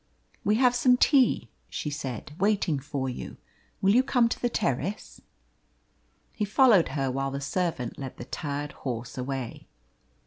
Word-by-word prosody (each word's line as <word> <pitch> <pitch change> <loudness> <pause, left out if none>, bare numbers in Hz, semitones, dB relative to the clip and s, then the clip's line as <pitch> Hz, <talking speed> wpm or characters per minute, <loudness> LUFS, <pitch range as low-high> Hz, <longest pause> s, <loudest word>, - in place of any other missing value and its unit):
"We 210 - +3
have 250 +1 +4
some 250 0 +4
tea," 265 -1 +4 0.2
she 150 - -4
said, 135 -3 -5
"waiting 195 -7 +2
for 140 -1 -3
you. 125 - -6 0.5
Will 195 +1 +5
you 250 - +6
come 250 -3 +3
to - - -4
the 245 - +1
terrace?" 155 - -2 1.1
He 215 - -2
followed 210 -3 +5
her, 135 -2 0
while 135 +1 -1
the 140 0 -4
servant 140 -4 -2
led 135 -2 -6
the 120 - -7
tired 145 +1 -4
horse 120 -2 -5
away. 130 -2 -5
150 Hz, 150 wpm, -27 LUFS, 135-215 Hz, 1.1 s, you